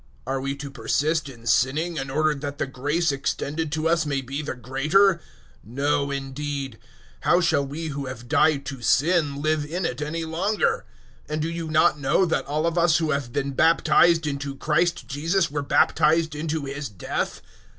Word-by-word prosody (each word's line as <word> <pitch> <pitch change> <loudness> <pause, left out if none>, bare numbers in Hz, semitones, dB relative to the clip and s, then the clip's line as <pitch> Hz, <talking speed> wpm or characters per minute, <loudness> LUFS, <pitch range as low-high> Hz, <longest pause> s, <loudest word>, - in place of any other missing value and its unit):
Are 135 0 -2
we 140 +1 -2
to 140 0 -7
persist 155 +2 0
in 115 -3 -13
sinning 155 +8 +1
in 135 -1 -3
order 155 +3 +2
that 145 0 -6
the - - -1
grace 145 +5 0
extended 145 +3 -2
to 160 0 0
us 165 0 +2
may 140 -3 -1
be 135 +3 -4
the 145 -3 -4
greater? 150 +10 +3 0.5
006:002 110 - -15
No, 140 0 +1
indeed; 140 -2 -4 0.4
how 175 - +3
shall 160 -5 +2
we 155 +4 -5
who 140 -2 -4
have 120 -2 -8
died 140 +1 +3
to 135 -2 -6
sin, 145 +2 +2
live 155 -1 +1
in 170 +5 -3
it 125 0 -3
any 160 +2 -3
longer? 205 - 0 0.4
006:003 - - -6
And 155 - -1
do 165 - -1
you 170 -1 -4
not 155 -1 +3
know 145 +7 +2
that 165 - -1
all 150 +3 -1
of 170 +1 +1
us 170 -2 +4
who 160 -2 0
have 140 -4 -2
been 140 +2 -2
baptized 165 +2 +4
into 140 -1 -3
Christ 170 +5 0
Jesus 165 +5 0
were 145 0 -2
baptized 160 +2 +3
into 155 0 -3
His 140 0 -5
death? 100 -4 -4
150 Hz, 190 wpm, -24 LUFS, 140-160 Hz, 0.5 s, us